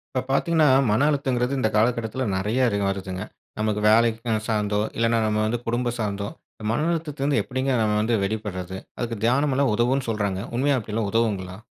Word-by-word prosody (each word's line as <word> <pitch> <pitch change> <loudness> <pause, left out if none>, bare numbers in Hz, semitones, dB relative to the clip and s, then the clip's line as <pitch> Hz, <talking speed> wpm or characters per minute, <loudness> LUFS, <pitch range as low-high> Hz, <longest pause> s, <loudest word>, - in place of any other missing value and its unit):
இப்போ, 130 - +2
பார்த்தீங்கன்னா, 160 +2 +3 0.2
மன 110 +7 +3
அழுத்தம்ங்கறது 130 -3 0
இந்த 110 -4 +2
காலகட்டத்தில 115 +3 +1
நெறைய 110 +7 +1
இரு 100 - -1
வருதுங்க. 95 -1 -4 0.4
நமக்கு 110 -1 0
வேலை 115 +2 +5 0.4
சார்ந்தோ 105 -2 0 0.2
இல்லன்னா, 115 0 +2
நம்ம 105 0 0
வந்து 115 +2 -1
குடும்பம் 120 +1 -1
சார்ந்தோ, 100 -2 -2 0.4
மன 150 +7 0
அழுத்தத்தில்வந்து 150 -4 -1
எப்படி 130 0 -5 0.2
நம்ம 105 -1 +1
வந்து 115 +2 0
வெளிபடுறது 95 -3 -4 0.2
அதுக்கு 120 -1 -2
தியானம் 140 +4 +2
எல்லாம் 135 -5 +2
உதவும்ன்னு 125 +3 +1
சொல்றாங்க. 100 -4 -1 0.2
உண்மையா 135 +2 +2
அப்படில்லாம் 105 -1 -3
உதவுங்களா? 100 -5 -1
115 Hz, 160 wpm, -24 LUFS, 105-130 Hz, 0.4 s, வேலை